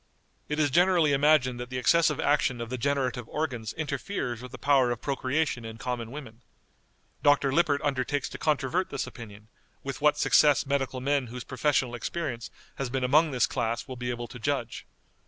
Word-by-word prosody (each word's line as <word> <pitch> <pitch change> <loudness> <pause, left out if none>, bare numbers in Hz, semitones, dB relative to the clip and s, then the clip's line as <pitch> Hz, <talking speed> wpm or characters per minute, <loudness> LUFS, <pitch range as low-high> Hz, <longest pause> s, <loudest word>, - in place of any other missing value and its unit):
It 150 - -1
is 145 -2 +2
generally 175 -2 +4
imagined 140 -3 +3
that 125 0 -6
the 130 - -4
excessive 150 +4 +3
action 145 -4 +1
of 115 0 -6
the 130 - -2
generative 130 -3 -1
organs 125 -8 -3
interferes 145 - -3
with 125 -1 -9
the - - -8
power 135 -3 +3
of 120 -2 -2
procreation 135 -1 -1
in 110 0 -8
common 120 -2 -4
women. 125 -4 -9 0.8
Dr. 145 -2 +3
Lippert 145 -2 +2
undertakes 145 0 -1
to - - -8
controvert 155 +4 0
this - - -3
opinion, 105 -4 -11 0.4
with 135 0 -5
what 150 0 +4
success 145 -1 +4
medical 135 -2 -1
men 140 -1 0
whose 125 +2 -7
professional 130 -1 0
experience 120 -1 -4 0.3
has 135 -2 -3
been 130 +1 -2
among 155 +6 +4
this 130 -3 +2
class 115 -2 -2
will 130 - -6
be 125 0 -4
able 120 -1 -4
to 125 - -9
judge. 125 -2 -3
135 Hz, 180 wpm, -28 LUFS, 125-145 Hz, 0.8 s, generally